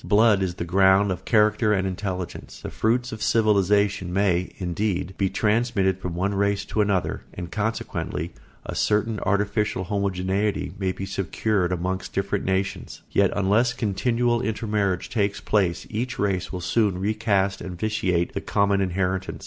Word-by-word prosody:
Blood 105 -1 +4
is 90 -2 -1
the 85 - -4
ground 95 +2 +4
of 90 0 -5
character 105 0 +3
and 95 -2 +1
intelligence. 95 -2 -5
The - - -6
fruits 120 +3 0
of 110 - -7
civilisation 100 -4 +2
may, 95 -1 +1
indeed, 95 0 -2
be 95 -1 0
transmitted 105 -4 +1
from 90 -2 -4
one 95 +3 0
race 100 0 0
to 110 - +3
another 100 -3 0
and 90 -2 -6
consequently 105 -6 -3 0.3
a - - -5
certain 105 +1 +1
artificial 105 0 0
homogeneity 100 +1 -1
may 95 -2 0
be 95 - -5
secured 95 0 -1
amongst 95 +1 -3
different 100 0 -1
nations; 95 +1 -2
yet 100 -1 +3
unless 105 +5 +2
continual 120 +2 +1
intermarriage 105 -5 -1
takes 100 -4 -1
place 95 -5 0
each 120 +3 -3
race 95 -3 -1
will 90 - -4
soon 100 +1 +1
recast 100 -1 0
and 90 -2 -6
vitiate 95 -5 0
the - - -3
common 100 -1 +1
inheritance. 95 0 -1
100 Hz, 150 wpm, -24 LUFS, 95-105 Hz, 0.3 s, Blood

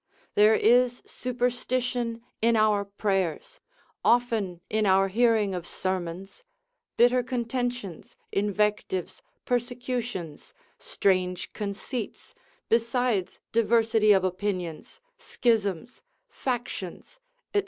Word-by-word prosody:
There 210 +1 +6
is 245 +2 +3
superstition 245 -1 -2 0.2
in 230 +1 +4
our 215 -2 +3
prayers, 195 -4 -2 0.4
often 225 -7 +2
in 215 -1 +1
our 195 0 +4
hearing 220 -2 +3
of 175 -1 -5
sermons, 185 - -4 0.5
bitter 245 +1 +5
contentions, 245 -6 -3 0.2
invectives, 205 -2 -1 0.2
persecutions, 245 - -3 0.2
strange 185 - 0
conceits, 215 - -5 0.3
besides 230 -3 +1
diversity 225 -1 +3
of 190 -2 +5
opinions, 185 -3 -3 0.2
schisms, 225 -2 -1 0.3
factions, 245 - -5 0.3
&c. 410 - +4
220 Hz, 85 wpm, -27 LUFS, 195-245 Hz, 0.5 s, There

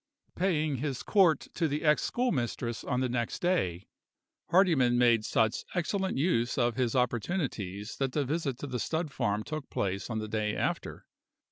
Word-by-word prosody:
PAYING 155 -6 +1
his 135 -1 -3
court 180 -8 +4
to 165 - +1
the 150 +2 -2
ex 150 -1 +4
schoolmistress 120 - -1
on 125 - -1
the 130 - +1
next 120 -1 -2
day, 100 - 0 0.6
Hardyman 160 -10 +4
made 120 -3 +4
such 110 0 +1
excellent 190 +1 -1
use 130 -6 +1
of 120 -3 +2
his 125 -1 0
opportunities 120 - -2
that 135 -2 -1
the 145 -2 +1
visit 145 -2 -2
to - - -6
the 125 -3 -3
stud 160 +6 -2
farm 105 -4 -1
took 155 0 -6
place 100 +2 -2
on 110 - -2
the 110 0 -3
day 105 -1 -1
after. - - -3
130 Hz, 165 wpm, -30 LUFS, 115-160 Hz, 0.6 s, court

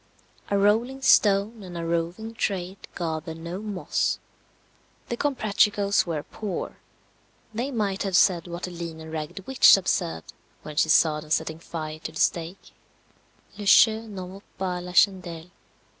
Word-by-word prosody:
A 200 - +2
rolling 230 +7 +2
stone 210 -1 +4
and 180 -3 -8
a 165 - -4
roving 170 +7 -2
trade 195 -3 -3 0.2
gather 160 -1 -4
no 170 +3 -6
moss. 205 -4 -1 0.9
The 240 - -1
Comprachicos 210 -7 +1
were 155 -3 -2
poor. 205 -5 -5 0.8
They 240 +5 -2
might 205 -6 -1
have 195 -2 -1
said 180 -2 +4
what 175 +1 -7
the 180 - -3
lean 170 -2 -7
and 160 0 -9
ragged 160 +5 -5
witch 265 -6 +7
observed, 80 - -2 0.3
when 150 - -8
she 160 - +2
saw 155 -1 +4
them 150 - -13
setting 160 +1 -1
fire 155 -2 -6
to - - -6
the - - -8
stake, 170 +3 -1 0.9
"Le 205 - -5
jeu 220 +2 +5
n'en 190 -4 -7
vaut 195 +2 -12
pas 180 -2 -3
la 180 0 -8
chandelle." 180 -3 +2
185 Hz, 155 wpm, -25 LUFS, 165-205 Hz, 0.9 s, witch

